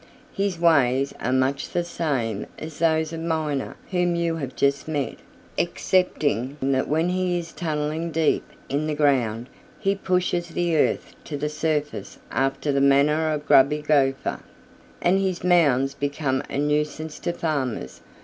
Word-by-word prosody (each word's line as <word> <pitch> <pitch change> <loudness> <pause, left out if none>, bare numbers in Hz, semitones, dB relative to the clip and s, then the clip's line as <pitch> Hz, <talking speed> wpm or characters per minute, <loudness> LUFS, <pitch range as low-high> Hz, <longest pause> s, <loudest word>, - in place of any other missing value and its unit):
His 195 -3 -1
ways 140 -5 +3
are 125 - -1
much 130 +2 +1
the 175 - 0
same 135 -11 -2
as 155 -1 -8
those 160 -1 +2
of 165 - -4
Miner 160 -4 -2 0.2
whom 175 -1 +1
you 170 -1 0
have 135 -4 -5
just 140 +1 +1
met, 145 -3 -2 0.4
excepting 145 -7 0
that 135 0 +1
when 160 +4 +1
he 180 -1 0
is 165 -1 -5
tunneling 155 0 -2
deep 160 -1 +1 0.2
in 145 +3 -1
the 155 - -1
ground 125 -6 +2 0.3
he 195 -2 +1
pushes 180 -2 0
the 175 -1 0
earth 155 - +1
to 145 - -4
the 150 +1 -2
surface 150 -1 -2
after 135 +2 0
the 140 0 +1
manner 150 +3 +4
of 150 -1 -3
Grubby 150 +3 +5
Gopher, 135 -3 +1 0.6
and 185 +2 +4
his 190 -3 -1
mounds 145 -7 +3
become 140 -2 -1
a - - -3
nuisance 150 +1 -1
to - - -1
farmers. 130 - -3
150 Hz, 150 wpm, -24 LUFS, 140-170 Hz, 0.6 s, Grubby